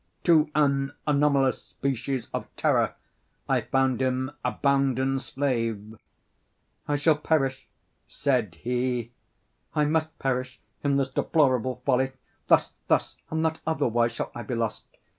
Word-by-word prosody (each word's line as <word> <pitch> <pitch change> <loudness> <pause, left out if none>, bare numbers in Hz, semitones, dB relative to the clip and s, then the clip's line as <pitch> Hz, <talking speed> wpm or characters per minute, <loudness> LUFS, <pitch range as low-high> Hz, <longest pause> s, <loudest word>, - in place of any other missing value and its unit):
To 160 -3 +5
an 140 -2 +2
anomalous 140 -3 +2
species 135 -1 -3
of - - -3
terror - - +2 0.5
I - - +2
found 130 -1 +1
him 130 +1 0
a - - +1
bounden 135 -1 +1
slave. 115 -6 -2 0.9
"I 145 - +1
shall 145 +1 +3
perish," 135 -4 0 0.4
said 125 - 0
he, 120 +3 -2 0.6
"I 150 - +3
must 160 +1 0
perish 130 -1 -2 0.2
in 140 -1 +2
this 135 -1 0
deplorable 130 -4 +1
folly. 130 0 +2 0.3
Thus, - - +4 0.2
thus, - - +1
and 160 0 -1
not 160 0 0
otherwise, 120 -7 +1
shall - - -4
I 120 - -6
be 120 +2 -4
lost. 115 -2 -2
135 Hz, 130 wpm, -26 LUFS, 125-145 Hz, 0.9 s, To